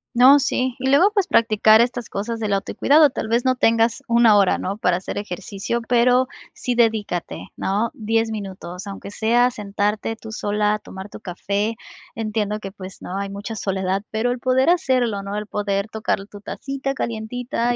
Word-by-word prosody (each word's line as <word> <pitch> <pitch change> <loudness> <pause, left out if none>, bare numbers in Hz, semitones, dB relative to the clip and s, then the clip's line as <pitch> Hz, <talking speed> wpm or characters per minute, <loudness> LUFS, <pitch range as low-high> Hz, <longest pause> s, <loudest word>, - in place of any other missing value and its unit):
No, 260 +4 +8
sí, 255 -2 0
y 260 +1 0
luego 345 +10 +5
pues 400 -3 +1
practicar 220 - +5
estas 245 -1 -1
cosas 225 +3 -4
del 215 -2 -1
autocuidado. 285 +8 +3
Tal 220 - -4
vez 235 +3 +1
no 255 - +3
tengas 230 0 +2
una 235 -3 +5
hora, 195 -2 +3
¿no?, 195 +2 -4
para 180 -4 +1
hacer 185 - -5
ejercicio, 205 +4 -4
pero 250 +1 +4 0.3
sí 250 - -2
dedícate, 220 -7 -1
¿no?, 210 +4 -1
10 225 0 0
minutos, 190 -3 -7
aunque 200 0 -7
sea 240 +4 +2
sentarte 210 0 -2
tú 220 0 -10
sola, 210 0 0
tomar 190 +2 -9
tu - - -10
café. 200 +3 -2 0.4
Entiendo 215 -2 -2
que 195 -2 -7
pues, 190 -2 -10
¿no?, 185 - -5
hay 200 0 -3
mucha 200 +3 -6
soledad, 190 -1 -1
pero 220 +3 0
el 245 - -3
poder 260 +5 +3
hacerlo, 250 - +1
¿no?, 200 +1 -5
el 210 - -3
poder 200 0 -2
tocar 215 -2 -2
tu 205 0 -13
tacita 275 +4 -4
calientita 240 +2 -2
220 Hz, 175 wpm, -22 LUFS, 200-245 Hz, 0.4 s, No